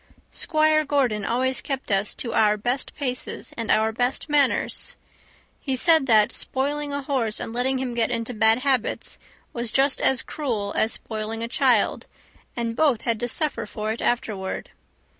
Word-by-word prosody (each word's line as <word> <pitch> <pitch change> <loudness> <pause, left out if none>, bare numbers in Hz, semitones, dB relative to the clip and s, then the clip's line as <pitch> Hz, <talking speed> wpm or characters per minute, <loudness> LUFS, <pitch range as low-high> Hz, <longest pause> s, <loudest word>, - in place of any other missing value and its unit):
Squire 310 -1 +2
Gordon 265 -8 0
always 255 +1 0
kept 270 -5 -4
us 195 +1 +1
to 235 - -2
our 210 -1 +3
best 245 +5 -1
paces 255 -3 -3
and 230 -2 -5
our 220 +1 +3
best 245 +6 -1
manners. 290 -2 +1 0.6
He 265 -2 -2
said 320 +1 +5
that 215 -3 +4
spoiling 290 +2 -2
a 285 0 -3
horse 255 -6 0
and 225 - -5
letting 255 +2 0
him 255 -2 -3
get 235 -1 +1
into 235 0 -3
bad 220 0 +4
habits 265 -4 -1 0.3
was 235 -2 -1
just 270 0 +2
as 265 - +2
cruel 225 -9 -3
as 220 - +2
spoiling 220 +1 -4
a - - -2
child, 245 -3 +2 0.5
and 230 -1 -2
both 275 -7 +2
had 230 -2 -1
to 240 - -2
suffer 235 -3 0
for 215 +1 -4
it 225 - -4
afterward. 220 -6 -2
245 Hz, 165 wpm, -24 LUFS, 220-270 Hz, 0.6 s, said